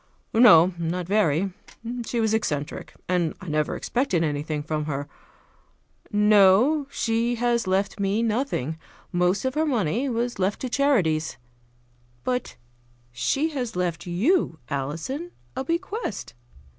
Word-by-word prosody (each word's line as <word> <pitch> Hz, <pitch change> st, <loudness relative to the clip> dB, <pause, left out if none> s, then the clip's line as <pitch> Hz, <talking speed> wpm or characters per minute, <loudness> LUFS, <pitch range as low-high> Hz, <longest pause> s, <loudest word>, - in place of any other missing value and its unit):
"No, 190 Hz, -7 st, +7 dB
not 170 Hz, +2 st, -2 dB
very. 190 Hz, -2 st, +1 dB, 0.5 s
She 240 Hz, -, -1 dB
was 220 Hz, -1 st, +2 dB
eccentric, 150 Hz, -10 st, -2 dB
and 175 Hz, -3 st, 0 dB
I 185 Hz, -, -10 dB
never 150 Hz, 0 st, 0 dB
expected 235 Hz, -10 st, 0 dB
anything 150 Hz, 0 st, -2 dB
from 155 Hz, -1 st, -2 dB
her. 145 Hz, -1 st, -3 dB, 1.0 s
No, 210 Hz, +7 st, +5 dB
she 230 Hz, -1 st, 0 dB
has 235 Hz, -2 st, 0 dB
left 195 Hz, +2 st, 0 dB
me 200 Hz, +3 st, +1 dB
nothing. 215 Hz, -, -1 dB, 0.3 s
Most 180 Hz, +5 st, +1 dB
of 260 Hz, -, 0 dB
her 310 Hz, -, +1 dB
money 240 Hz, -, 0 dB
was 240 Hz, -2 st, -2 dB
left 190 Hz, +2 st, 0 dB
to 255 Hz, -, -3 dB
charities; 185 Hz, -, +1 dB, 0.9 s
but 250 Hz, -1 st, -2 dB, 0.6 s
she 125 Hz, -, 0 dB
has 250 Hz, -7 st, -4 dB
left 180 Hz, -2 st, -2 dB
you, 200 Hz, -, +1 dB
Alison, 165 Hz, -, -4 dB, 0.2 s
a -, -, -2 dB
bequest. 340 Hz, -, -3 dB
200 Hz, 125 wpm, -25 LUFS, 165-245 Hz, 1.0 s, No